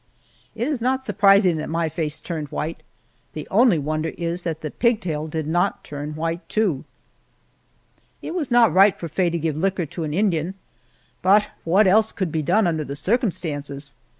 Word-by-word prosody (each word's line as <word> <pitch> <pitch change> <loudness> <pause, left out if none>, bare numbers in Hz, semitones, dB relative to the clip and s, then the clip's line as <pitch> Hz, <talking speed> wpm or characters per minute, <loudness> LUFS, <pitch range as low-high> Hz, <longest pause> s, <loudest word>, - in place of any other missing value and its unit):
It 230 +3 -2
is 290 -6 -2
not 260 +2 0
surprising 195 -6 +4
that 155 - -4
my 165 0 0
face 155 -1 -3
turned 160 -4 -5
white; 155 +3 -4 0.5
the 155 - -6
only 220 -2 +5
wonder 155 +2 -2
is 170 +1 -3
that 160 -2 -4
the 155 - -5
pigtail 185 -11 0
did 160 0 -3
not 175 +3 0
turn 150 +1 -6
white, 165 +2 -3
too! 195 -11 0 1.3
It - - -6
was 330 -7 -2
not 240 -8 +5
right 195 +2 +5
for 170 - -4
Faye 175 +3 0
to 170 - -2
give 160 -2 -1
liquor 185 +2 0
to 165 +3 -6
an 155 - -3
Indian, 180 -1 0 0.7
but 200 +3 +4 0.2
what 190 +6 +4
else 215 +3 +4
could 185 -5 -2
be 160 - -1
done 185 +8 +2
under 160 -3 0
the 140 -1 -6
circumstances? 145 - -2
170 Hz, 180 wpm, -22 LUFS, 155-200 Hz, 1.3 s, only